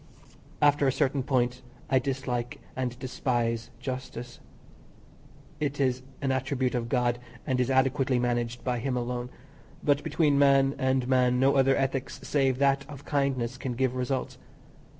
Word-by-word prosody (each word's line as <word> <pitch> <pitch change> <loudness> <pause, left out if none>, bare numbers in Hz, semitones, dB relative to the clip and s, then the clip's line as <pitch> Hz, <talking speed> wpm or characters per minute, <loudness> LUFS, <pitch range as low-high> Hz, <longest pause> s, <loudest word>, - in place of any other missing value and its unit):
After 145 -1 +4
a - - +4
certain 135 +1 +1
point 125 -2 0 0.3
I 130 - +3
dislike 125 -2 -3 0.2
and 125 -2 -2
despise 120 -2 -1
justice. 130 -2 -6 1.2
It 145 -1 -2
is 130 -2 +1 0.2
an 135 - +1
attribute 130 -1 0
of 120 -2 -2
God, 120 -1 +1 0.3
and 130 -3 0
is 125 0 +1
adequately 130 0 +2
managed 120 -1 -1
by 125 -2 -1
Him 125 +1 -1
alone; 125 0 -3 0.5
but 145 -1 +3
between 150 -2 +2
man 135 -1 +5
and 130 -1 +1
man 125 -1 +3
no 135 +2 +4
other 135 0 +4
ethics 135 -1 -2
save 135 -3 +1
that 140 0 +3
of 140 -2 -10
kindness 130 -3 -1
can 130 - -3
give 130 0 +1
results. 130 +1 -2
130 Hz, 150 wpm, -28 LUFS, 125-135 Hz, 1.2 s, man